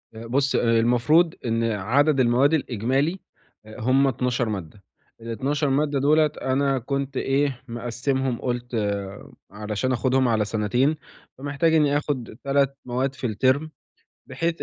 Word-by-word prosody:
أ 115 +1 -8
بُص 135 +3 +1
المفروض 120 +8 +3
إن 115 0 0
عدد 120 +7 +1
المواد 130 +4 +3
الإجمالي 135 - 0 0.5
أ 110 - -11
هم 130 +4 +3
12 125 -2 -1
مادّة. 100 -1 -6 0.4
ال12 135 +6 -1
مادّة 145 +1 +1
دُولَة 155 +3 +4 0.2
أنا 135 0 +1
كنت 140 +1 -3
إيه، 135 -1 0
مقسِّمهم 125 +2 -2
قُلت 120 -1 -3 0.8
علشان 105 +4 -3
آخُدهم 130 +1 +2
على 110 -3 +1
سنتين، 120 +8 +1 0.4
فمحتاج 145 +4 0
إنّي 145 -2 +3
آخُد 130 -7 -4
3 140 0 +1
مواد 130 +2 -2
في 130 - -3
الترم 130 +8 +1 0.6
بحيث 165 0 -2
130 Hz, 125 wpm, -24 LUFS, 115-140 Hz, 0.8 s, دُولَة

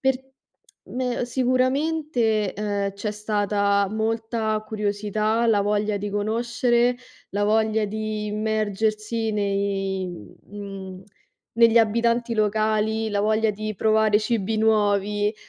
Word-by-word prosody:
per 265 -1 +2 0.7
me 250 -1 -2
ehm, - - -1
sicuramente, 255 - +1
ehm, 200 -1 -2
c'è 205 +1 -4
stata 205 -1 +1
molta 220 0 -1
curiosità, 215 +2 0
la 205 -2 +4
voglia 210 0 0
di 205 0 -4
conoscere, 235 +3 +1 0.3
la 205 +1 -1
voglia 220 0 +2
di 215 0 -3
immergersi 215 +1 -1
nei 195 -2 -1
mhmm, 190 - -9 0.5
negli 230 0 +6
abitanti 235 +1 +2
locali, 215 +1 +1
la 205 0 0
voglia 220 +1 +2
di 215 +1 -5
provare 215 0 +3
cibi 220 -1 -1
nuovi, 210 -1 +2
215 Hz, 110 wpm, -24 LUFS, 205-225 Hz, 0.7 s, negli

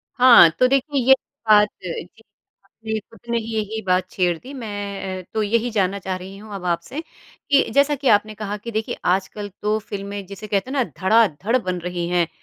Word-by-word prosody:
हाँ, 245 -9 +8
तो 255 - +6
देखिए 275 +2 +1
ये 265 - +9 0.4
बात 210 0 +7 0.2
अ, 180 - -3 0.8
आपने 220 +2 -5
खुद 225 +2 -19
ने 235 - +1
ही 225 0 -6
यही 220 +1 -2
बात 185 0 +1
छेड़ 175 -3 +1
दी 265 - -11
मैं 200 -5 -5
तो 220 - 0
यही 230 +3 +1
जानना 200 -2 0
चाह 190 -1 -3
रही 190 +2 -10
हूँ 210 0 -11
अब 180 -2 -7
आपसे, 170 - -2 0.5
कि 275 - +4
जैसा 285 +1 +4
कि 275 0 -3
आपने 215 0 +3
कहा 210 0 -4
कि 230 +3 -8
देखिए 220 0 -3
आजकल 195 +3 -1
तो 210 +1 +1
फ़िल्में 200 -1 -6
जिसे 200 +3 -9
कहते 200 +3 -1
हैं - - -4
ना 260 - +3 0.2
धड़ाधड़ 215 +1 +3
बन 185 -6 -3
रही 175 0 -3
हैं, 175 -2 +2
210 Hz, 200 wpm, -22 LUFS, 190-230 Hz, 0.8 s, ये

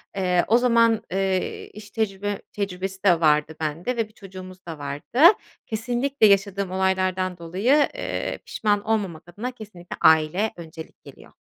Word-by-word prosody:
Eee, 180 -2 +1
o 230 - +5
zaman, 230 -3 +3
ııı, 190 -1 -1
iş 205 0 -12
tecrübe 205 -2 -2
tecrübesi 190 -1 -4
de 180 -4 +4
vardı 150 0 +3
bende 165 +11 -3
ve 225 -2 0
bir 215 - -25
çocuğumuz 185 -2 -11
da 165 -2 -7
vardı. 145 - -5 0.5
Kesinlikle 240 +3 +1
yaşadığım 200 -1 +1
olaylardan 185 -1 0
dolayı, 200 - +2
ııı, - - -3
pişman 205 -1 0
olmamak 200 -8 -2
adına 215 +8 -5
kesinlikle 205 -7 -10
aile 160 +7 +4
öncelik 160 -1 -11
geliyor. - - -15
195 Hz, 140 wpm, -24 LUFS, 175-215 Hz, 0.5 s, o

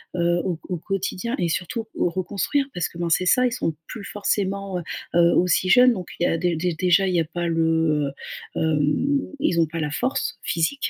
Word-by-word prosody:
heu, 175 0 +2
au 180 -3 -1
q - - -17
au 180 - -1
quotidien 195 +6 -3
et 175 -2 0
surtout 190 +7 -2
où - - +1
reconstruire 200 - -1
parce 175 - -1
que - - -13
ben 170 0 -2
c'est 175 +2 +2
ça, 250 +7 +4
ils 250 - +1
sont 165 -9 -2
plus 215 - -8
forcément, 200 -2 -1
heu - - -7 0.3
heu, 170 0 +5
aussi 180 +1 +2
jeunes. 250 +5 +7
Donc 185 -4 -6
il - - 0
y - - +4
a 165 - +1
dé 175 0 0
dé 170 +1 -1
déjà, 185 +1 +4
il 185 - 0
y - - +4
a 165 - +1
pas 170 +2 -3
le, 160 -3 +1 0.4
heu, - - -1
hem, 160 - +1 0.2
ils 180 - +1
ont 165 - +5
pas 165 +2 -5
la 150 - -1
force 260 - -1
physique, 170 - 0
175 Hz, 230 wpm, -23 LUFS, 165-200 Hz, 0.4 s, jeunes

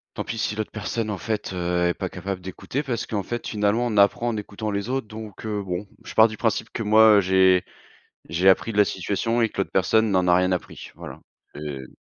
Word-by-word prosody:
tant - - -3
pis 115 - -5
si 105 - -1
l'autre 110 0 -4
personne 110 +1 -3
en 105 - -3
fait, 110 -1 -3
heu, 90 -1 0
est - - +1
pas 95 0 -4
capable 95 +1 -5
d'écouter 95 +9 -4
parce 120 -4 -3
qu'en 100 -3 -3
fait 120 +3 -5
finalement 105 +3 +1
on 105 -3 -2
apprend 100 +4 +4
en 110 - -2
écoutant 105 +1 -5
les 100 +3 -3
autres 130 -3 -2
donc, 110 -1 -9
heu, 105 -2 -2
bon, 95 +2 -4 0.2
je - - -9
pars 110 - +7
du 110 -1 -8
principe 115 -2 -1
que 115 - -4
moi, 110 0 +6
heu, 100 - +5
j'ai 95 -1 +4 0.6
j'ai 90 +3 +3
appris 115 +4 +3
de - - -5
la 105 - +6
situation 105 +6 -1
et 115 - +3
que - - -8
l'autre - - -5
personne 110 +3 +2
n'en 90 -1 +2
a 90 - +5
rien 90 +1 +2
appris. 90 - -5
Voilà, - - -9 0.4
heu 70 -3 -6
105 Hz, 240 wpm, -24 LUFS, 95-110 Hz, 0.6 s, pars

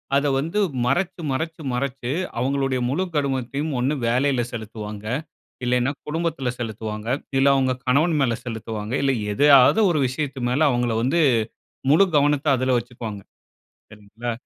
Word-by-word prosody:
அத 140 - +2
வந்து 165 +9 -1 0.3
மறச்சு 170 +6 0
மறச்சு 160 +4 -3
மறச்சு 125 -1 -3 0.3
அவுங்களுடைய 135 0 0
முழுக் 175 +4 -2
கவனத்தையும் 140 +2 -1
ஒண்ணு 135 +4 +1
வேலைல 130 +2 +2
செலுத்துவாங்க. 105 -2 -7 0.6
இல்லைனா, 125 +2 +1 0.2
குடும்பத்துல 155 -5 -2
செலுத்துவாங்க. 110 -1 -5 0.3
இல்ல, 135 - +4
அவங்க 130 -1 +2
கணவன் 155 +6 +3
மேல 120 -3 +2
செலுத்துவாங்க. 110 -1 -5
இல்ல, 135 - +3 0.2
எதையாவது 140 - +6
ஒரு 155 -4 +1
விஷயத்து 135 +1 -4
மேல, 135 +5 0
அவங்கள 120 -2 0
வந்து 135 +8 +1 0.7
முழு 165 +7 +6
கவனத்த 145 0 +2
அதுல 130 0 +1
வச்சுக்குவாங்க, 115 -4 -7 0.7
சரிங்களா. 105 +3 -6
130 Hz, 130 wpm, -23 LUFS, 120-145 Hz, 0.7 s, எதையாவது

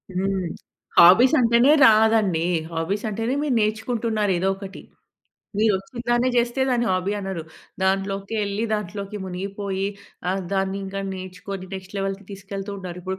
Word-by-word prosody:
హ్మ్. 190 -1 0 0.5
హాబీస్ 190 - +8
అంటేనే 235 +3 +5 0.2
రాదండీ! 215 -6 +4 0.3
హాబీస్ 175 +6 -2
అంటేనే 225 +4 -2
మీరు 295 -3 0
నేర్చుకుంటున్నారు 220 -1 0
ఏదోకటి. 195 +2 -3 0.8
మీరు 215 +1 +4
వచ్చినదాన్నే 240 +5 -1
చేస్తే 240 +2 +1
దాన్ని 240 -2 +1
హాబీ 185 +2 0
అనరు. 190 -4 -4 0.4
దాంట్లోకెళ్ళి, 195 +2 -1
దాంట్లోకి 205 0 -4
మునిగిపోయి 195 +1 -3 0.4
ఆహ్, 190 +1 -1
దాన్ని 195 0 0
ఇంకా 195 +1 -5
నేర్చుకొని 185 +1 -7
నెక్స్ట్ 190 0 -8
లెవెల్‌కి 195 0 -3
తీసుకెళ్తూ 195 +1 -6
ఉన్నారు. 180 -2 -7
ఇప్పుడు 190 +1 -4
195 Hz, 125 wpm, -23 LUFS, 190-220 Hz, 0.8 s, హాబీస్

